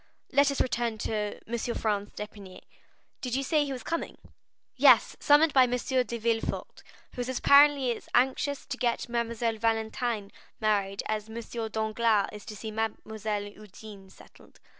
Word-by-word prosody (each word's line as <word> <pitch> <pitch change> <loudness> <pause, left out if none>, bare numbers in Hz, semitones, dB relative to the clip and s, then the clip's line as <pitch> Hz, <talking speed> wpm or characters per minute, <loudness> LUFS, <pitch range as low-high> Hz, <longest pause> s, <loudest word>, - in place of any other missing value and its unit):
Let 280 0 +4
us 280 - -2
return 235 -3 0
to 210 -1 -3
M. 235 +1 -2 0.2
Franz 205 -2 -1
d'Épinay. 205 -3 -9 0.6
Did 250 -1 -2
you 270 - 0
say 300 +2 +2
he 280 - -4
was 255 -3 -5
coming?" 335 - -3 0.6
"Yes; - - +5
summoned 295 +1 +5
by 260 -2 +7
M. 250 0 0
de 250 -1 -1
Villefort, 225 0 -2 0.3
who 250 - -4
is 250 +1 -3
apparently 280 -3 +5
as - - -13
anxious 265 +3 +1
to - - -5
get 240 0 -1
Mademoiselle 235 -1 -1
Valentine 225 -1 -1 0.3
married 200 -2 0
as 215 0 -3
M. 225 - -8 0.3
Danglars 220 -1 +1
is 210 -1 -10
to 215 - -8
see 220 +2 -6
Mademoiselle 220 -1 -3
Eugénie 205 -1 -12
settled. - - -19
225 Hz, 155 wpm, -28 LUFS, 215-250 Hz, 0.6 s, by